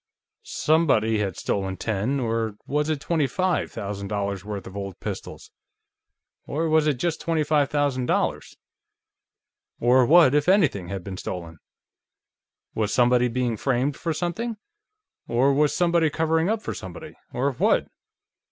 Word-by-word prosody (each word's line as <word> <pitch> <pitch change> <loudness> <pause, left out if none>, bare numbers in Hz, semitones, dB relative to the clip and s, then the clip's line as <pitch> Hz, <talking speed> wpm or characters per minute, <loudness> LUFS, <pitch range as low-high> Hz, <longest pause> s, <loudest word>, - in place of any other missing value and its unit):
Somebody 130 -9 +2
had 100 -4 -2
stolen 95 -1 -2
ten 110 +6 -1
or 115 -3 -1
was 150 +2 -1
it 155 -2 0
twenty 155 -1 0
five 180 +7 0
thousand 100 0 -5
dollars' 100 -2 -3
worth 100 -2 -6
of 95 - -10
old 100 -2 -6
pistols? - - -7 1.0
Or 160 +3 -1
was 155 -1 +3
it 150 - +2
just 160 +6 -2
twenty 165 -2 0
five 150 -2 +2
thousand 140 -4 0
dollars? - - -1 1.2
Or 125 +2 +5
what, 160 -4 +6
if 150 +3 +2
anything, 155 - +3
had 95 0 -5
been 95 -1 -6
stolen? 85 -4 -6 1.1
Was 110 -2 -1
somebody 125 0 +3
being 120 -1 -1
framed 135 +4 0
for 165 - -3
something... 195 +8 -3 0.7
or 130 +4 +3
was 150 +1 +3
somebody 170 -2 +2
covering 160 +3 +1
up 220 0 -1
for - - -3
somebody... 95 -2 -9 0.2
or 135 +3 0
what? 125 - +1
130 Hz, 145 wpm, -24 LUFS, 105-155 Hz, 1.2 s, what